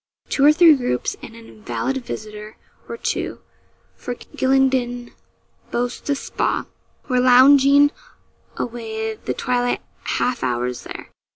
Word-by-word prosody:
Two 275 - +1
or 295 - +8
three 325 0 +7
groups, 280 +11 -2
and 225 - -10
an 230 0 -13
invalid 245 +4 -4
visitor 215 -1 -8 0.3
or 465 - -5
two - - -3 0.6
for 245 - -6
Gylingden 260 -2 0 0.6
boasts 245 +3 -3
a 285 - +2
'spa' - - -2 0.4
were 255 -2 +1
lounging 275 +3 +6 0.7
away 220 -2 -4
the 215 - -5
twilight 245 -1 -1 0.3
half 245 -1 -1
hours 125 0 -2
there. - - -9
245 Hz, 120 wpm, -21 LUFS, 225-270 Hz, 0.7 s, or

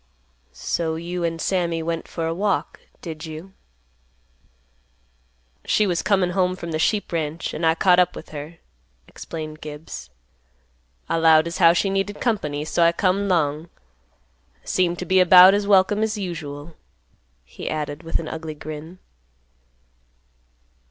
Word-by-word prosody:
"So 160 -2 -2
you 170 +2 -4
and 165 -1 -2
Sammy 170 -2 -1
went 165 0 -3
for 165 - -4
a 165 - -1
walk, 200 +3 -1 0.2
did 160 -1 -7
you?" 160 +5 -9 2.1
"She 215 - +2
was 175 -4 0
comin' 190 -3 +1
home 185 0 +1
from 170 -2 -7
th' 155 - -1
sheep 210 +4 0
ranch, 160 -1 -3
an' 165 - -5
I 160 0 +4
caught 180 +1 +4
up 180 -1 +2
with - - -10
her," 150 +2 -8 0.5
explained 155 -1 -8
Gibbs. 150 - -8 1.0
"I - - 0
'lowed 160 -1 +5
as 170 0 -5
how 170 -2 +7
she 195 +3 0
needed 195 +1 -2
company, 150 - -1
so 165 - -1
I 170 0 +6
come 195 +3 +1
'long. 160 -3 0 0.9
I - - -30
seemed 175 -1 +1
t' 180 - -5
be 185 +1 +4
'bout 180 +1 +9
as 205 0 0
welcome 205 +1 +4
as 220 0 0
usual," 160 -5 -6 0.7
he - - -7
added 150 0 -4
with 165 -1 -2
an 160 - -6
ugly 160 -1 -6
grin. 155 +4 -8
170 Hz, 150 wpm, -22 LUFS, 160-185 Hz, 2.1 s, bout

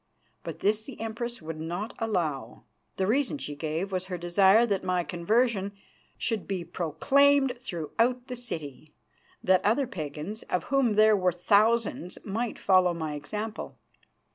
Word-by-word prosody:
But - - -7
this 215 +2 +2
the 270 - -10
Empress 230 -1 -5
would 160 0 -6
not 175 +7 -4
allow. 160 - -2 0.3
The 190 - +1
reason 270 +7 +1
she 150 - -6
gave 160 +6 -3
was 185 -1 -2
her 185 -1 -4
desire 190 +6 +5
that 200 -5 -1
my 180 -1 0
conversion 200 +3 0 0.4
should 225 -4 -2
be 190 -3 -2
proclaimed 270 - +3
throughout 235 - -1
the 250 -1 -6
city, 155 - -7 0.5
that 185 0 +4
other 230 +7 +2
Pagans, 160 - -6
of 180 - 0
whom 270 -5 +2
there 215 0 +6
were 185 -2 +2
thousands, 205 +1 +2
might 225 +4 -2
follow 185 -2 +3
my 160 -2 -3
example. 210 +9 -5
200 Hz, 145 wpm, -28 LUFS, 175-230 Hz, 0.5 s, there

